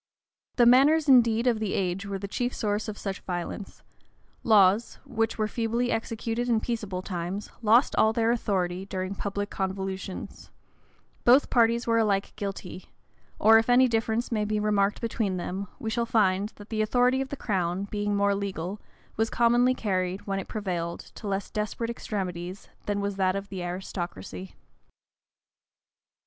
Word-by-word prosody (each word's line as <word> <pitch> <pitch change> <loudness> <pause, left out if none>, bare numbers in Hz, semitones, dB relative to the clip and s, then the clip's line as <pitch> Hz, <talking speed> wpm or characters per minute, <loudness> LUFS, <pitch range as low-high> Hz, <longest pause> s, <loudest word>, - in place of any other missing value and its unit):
The 240 - +5
manners 285 +6 +5
indeed 235 -3 +5
of 235 -3 +2
the 215 -3 -1
age 190 +1 -1
were 200 -1 -3
the 200 +1 -5
chief 245 +5 -2
source 210 0 -1
of 210 -1 -5
such 195 -1 -4
violence: 180 +2 -5 0.6
laws, 210 0 +4
which 225 -1 -1
were 215 -1 +1
feebly 235 +2 -1
executed 225 +1 -2
in 230 -2 +3
peaceable 210 -6 -3
times, 180 +2 -4
lost 230 +4 +4
all 220 - +4
their 225 0 +2
authority 185 -6 -1
during 185 0 -3
public 200 +1 -4
convulsions: 190 0 -5 0.7
both 255 +4 +5
parties 235 -1 +3
were 230 0 +3
alike 200 -3 0
guilty: 195 -3 -6 0.5
or, 225 +1 +7
if 225 - -2
any 255 +1 +6
difference 225 0 -1
may 215 -2 +1
be 210 0 -1
remarked 210 -1 +1
between 220 -5 -1
them, 190 +3 -4
we 220 - -4
shall 235 +1 0
find, 205 -3 +2
that 205 0 -13
the 220 -1 -1
authority 250 +4 +2
of 270 - -4
the - - -4
crown, 185 -4 -1
being 205 0 -2
more 200 0 +3
legal, 195 -1 -4 0.4
was 225 +1 +1
commonly 240 +2 +3
carried, 185 -3 -2
when 195 -1 -1
it 195 - -6
prevailed, 175 -5 -3
to 215 - -8
less 195 0 -2
desperate 215 +2 -2
extremities, 185 -4 -5 0.2
than 205 -1 0
was 200 -1 -2
that 185 -1 +2
of 200 0 -5
the 190 -2 -5
aristocracy. 175 - -6
205 Hz, 160 wpm, -27 LUFS, 190-230 Hz, 0.7 s, or